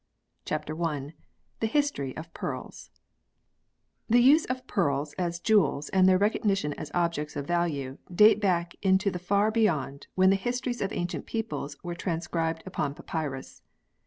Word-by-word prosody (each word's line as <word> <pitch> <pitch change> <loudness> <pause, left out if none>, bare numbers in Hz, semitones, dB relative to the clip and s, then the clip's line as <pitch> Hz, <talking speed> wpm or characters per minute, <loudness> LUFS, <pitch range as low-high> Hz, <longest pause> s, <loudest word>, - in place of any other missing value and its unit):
CHAPTER 155 +3 -3
I 150 -2 -2 0.5
THE 225 - +1
HISTORY 230 - -1
OF 165 +1 -8
PEARLS - - -6 1.2
THE 240 +2 +6
use 295 +5 +6
of 255 0 -4
pearls 145 - 0
as 170 -1 -1
jewels 195 -8 +2
and 190 -1 +5
their 185 - +5
recognition 200 -5 +1
as - - -7
objects 170 -4 -1
of 140 -1 -3
value 145 -6 -1
date 210 +3 +6
back 175 -3 +1
into 190 +1 +3
the 180 - -4
far 200 +4 +2
beyond 160 - 0
when 185 0 +5
the - - +4
histories 245 +3 -2
of 195 - -1
ancient 175 0 -3
peoples 210 -10 -4
were 175 -1 -4
transcribed 165 -2 -2
upon 155 -6 -2
papyrus. 150 -5 -5
175 Hz, 150 wpm, -28 LUFS, 155-210 Hz, 1.2 s, THE